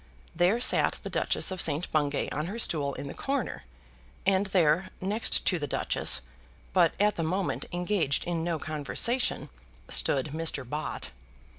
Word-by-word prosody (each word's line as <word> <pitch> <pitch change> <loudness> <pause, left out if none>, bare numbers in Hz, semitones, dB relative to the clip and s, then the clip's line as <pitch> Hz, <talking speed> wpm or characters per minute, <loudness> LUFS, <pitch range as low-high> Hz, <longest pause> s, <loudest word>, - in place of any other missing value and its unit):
There 180 +7 +3
sat 245 - +2
the - - -6
Duchess - - +1
of 185 -1 -1
St. 155 +3 +4
Bungay 145 -2 0
on 150 +3 -2
her 205 +5 -5
stool 145 -10 +1
in - - -6
the 140 - -6
corner, 270 - -3 0.6
and 195 +1 +3
there, 180 -2 +2
next 205 +5 -1
to 180 - +1
the 145 - -3
Duchess, 65 - +1 0.5
but 175 -3 +4
at 210 0 +2
the 165 - 0
moment 185 +4 -1
engaged 175 -5 0
in 170 -2 -2
no 170 -1 -1
conversation, 155 - -1 0.4
stood 140 +1 +2
Mr. 160 -5 -1
Bott. 150 - -4
170 Hz, 155 wpm, -28 LUFS, 150-190 Hz, 0.6 s, St